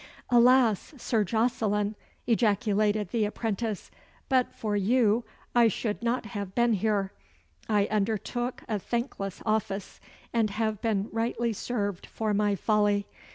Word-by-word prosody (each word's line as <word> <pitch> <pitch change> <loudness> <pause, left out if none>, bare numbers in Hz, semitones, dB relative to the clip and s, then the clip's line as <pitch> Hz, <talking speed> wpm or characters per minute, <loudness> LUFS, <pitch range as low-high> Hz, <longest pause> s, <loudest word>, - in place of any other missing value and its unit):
"Alas! 245 - +4
Sir 230 -3 +1
Jocelyn!" 215 -1 0 0.3
ejaculated 210 -3 +2
the 225 0 +1
apprentice, 215 0 -3 0.4
"but 260 -2 +2
for 210 -2 -2
you 225 +2 +3 0.3
I 240 -1 +6
should 215 0 -2
not 235 +1 0
have 200 -4 -6
been 235 -1 +3
here. 200 -1 0 0.6
I 205 -2 +3
undertook 220 +4 -2
a 215 -2 -1
thankless 215 -4 -3
office, 210 -3 -2 0.3
and 225 -2 +2
have 215 0 -2
been 210 -3 0
rightly 230 +1 -1
served 205 -4 -3
for 215 -1 -2
my 205 0 +2
folly. 205 0 +2
215 Hz, 125 wpm, -28 LUFS, 205-235 Hz, 0.6 s, I